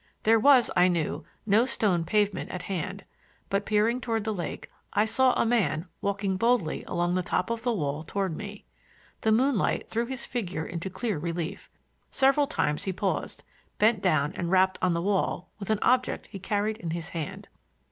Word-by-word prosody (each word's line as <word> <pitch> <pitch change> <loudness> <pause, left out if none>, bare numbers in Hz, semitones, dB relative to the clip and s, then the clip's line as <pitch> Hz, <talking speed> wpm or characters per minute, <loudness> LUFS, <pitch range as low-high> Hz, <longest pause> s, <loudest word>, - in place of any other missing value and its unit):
There 225 +1 +5
was, 260 0 +5
I 180 +1 +6
knew, 165 -4 -1 0.2
no 215 +2 +4
stone 180 -9 +1
pavement 205 +2 +1
at 180 -1 -5
hand, 195 +1 -4 0.5
but 200 +1 0
peering 220 +4 +2
toward 225 -3 -1
the 220 0 -1
lake 175 -5 -5 0.3
I 210 - +3
saw 250 +3 +3
a - - +3
man 180 -9 +1 0.2
walking 200 -1 -1
boldly 230 -6 +1
along 175 0 0
the 185 - +1
top 180 +3 -1
of 230 -1 -2
the 245 - 0
wall 150 -7 -2
toward 190 0 -2
me. 205 +2 -8 0.6
The 220 - +2
moonlight 245 0 +1
threw 230 +1 0
his 260 -1 -4
figure 185 -9 -3
into 170 +2 -4
clear 195 -1 -2
relief. 170 +3 -4 0.4
Several 275 +2 +3
times 150 - -1
he 190 - -1
paused, 190 +1 -2 0.3
bent 215 -1 +3
down 155 -6 +2
and 170 - -3
rapped 190 0 +3
upon 180 -2 +2
the 170 - -1
wall 190 -2 0
with 200 - -7
an 215 - +3
object 255 0 +2
he 195 - -7
carried 210 +3 -1
in 170 - -5
his 165 +1 -4
hand. 160 -4 -5
200 Hz, 185 wpm, -27 LUFS, 175-225 Hz, 0.6 s, I